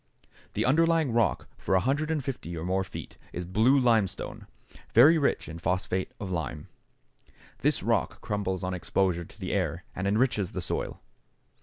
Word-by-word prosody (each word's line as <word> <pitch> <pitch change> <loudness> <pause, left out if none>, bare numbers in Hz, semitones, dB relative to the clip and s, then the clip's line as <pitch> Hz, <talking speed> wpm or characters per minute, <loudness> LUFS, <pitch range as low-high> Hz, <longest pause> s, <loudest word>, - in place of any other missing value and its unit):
The - - 0
underlying 165 +1 +3
rock 115 -1 +1
for - - -1
150 135 - -1
or 80 - -4
more 95 +1 +1
feet 95 - -9
is 90 - -4
blue 110 +10 +4
limestone, 115 -7 +1 0.5
very 150 +8 +8
rich 140 - 0
in 80 0 -7
phosphate 90 +2 -1
of 95 -2 -5
lime. 80 -3 -4 0.9
This - - +1
rock - - 0
crumbles 95 -3 -2
on 90 0 -2
exposure 90 -1 0
to - - -18
the 95 - -3
air 90 -3 -1
and 95 +2 -2
enriches 105 -2 +1
the - - -3
soil. - - -3
100 Hz, 150 wpm, -28 LUFS, 90-130 Hz, 0.9 s, very